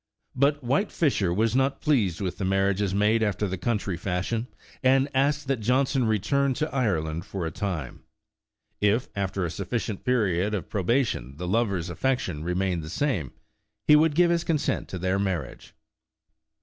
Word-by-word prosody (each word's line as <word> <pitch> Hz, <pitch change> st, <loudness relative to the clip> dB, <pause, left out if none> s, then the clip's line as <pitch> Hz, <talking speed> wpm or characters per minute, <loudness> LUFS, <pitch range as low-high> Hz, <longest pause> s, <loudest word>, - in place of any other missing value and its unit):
But 140 Hz, +1 st, +2 dB
''White 140 Hz, -, +1 dB
Fisher 130 Hz, -, +1 dB
'^ -, -, -1 dB
was 110 Hz, +3 st, +1 dB
not 135 Hz, +1 st, +1 dB
pleased 110 Hz, -, +1 dB
with 95 Hz, +1 st, -3 dB
the -, -, -2 dB
mar 95 Hz, +1 st, +2 dB
riages 100 Hz, 0 st, -1 dB
made 105 Hz, +3 st, +2 dB
after 105 Hz, -1 st, 0 dB
the 95 Hz, -, -2 dB
country 100 Hz, -1 st, -1 dB
fashion, 100 Hz, +7 st, -2 dB, 0.3 s
and 135 Hz, +1 st, +4 dB
asked 145 Hz, +3 st, +1 dB
that 135 Hz, -3 st, 0 dB
Johnson 130 Hz, +2 st, +1 dB
return 130 Hz, +6 st, +1 dB
to 155 Hz, +3 st, -2 dB
Ireland 85 Hz, -, 0 dB
for 95 Hz, -2 st, -5 dB
a 80 Hz, -, -3 dB
time. 85 Hz, -, -4 dB, 0.8 s
If, 105 Hz, +5 st, +2 dB
after 95 Hz, -2 st, -1 dB
a 85 Hz, -, -3 dB
suf 90 Hz, +1 st, -6 dB
ficient 110 Hz, -4 st, -2 dB
period 105 Hz, -6 st, +1 dB
of 95 Hz, -, -5 dB
probation, 100 Hz, -, 0 dB
the 90 Hz, +2 st, -4 dB
lover's 95 Hz, -4 st, 0 dB
affection 95 Hz, -, -1 dB
re 90 Hz, +2 st, -2 dB
mained 90 Hz, -2 st, 0 dB
the 80 Hz, -, -8 dB
same, 95 Hz, -, -1 dB, 0.5 s
he 150 Hz, -, +7 dB
would 155 Hz, 0 st, +4 dB
give 175 Hz, +1 st, +4 dB
his 170 Hz, -1 st, +1 dB
consent 155 Hz, -3 st, -1 dB
to 95 Hz, -, -5 dB
their 95 Hz, +2 st, 0 dB
marriage. 90 Hz, -11 st, -4 dB
105 Hz, 175 wpm, -26 LUFS, 90-130 Hz, 0.8 s, he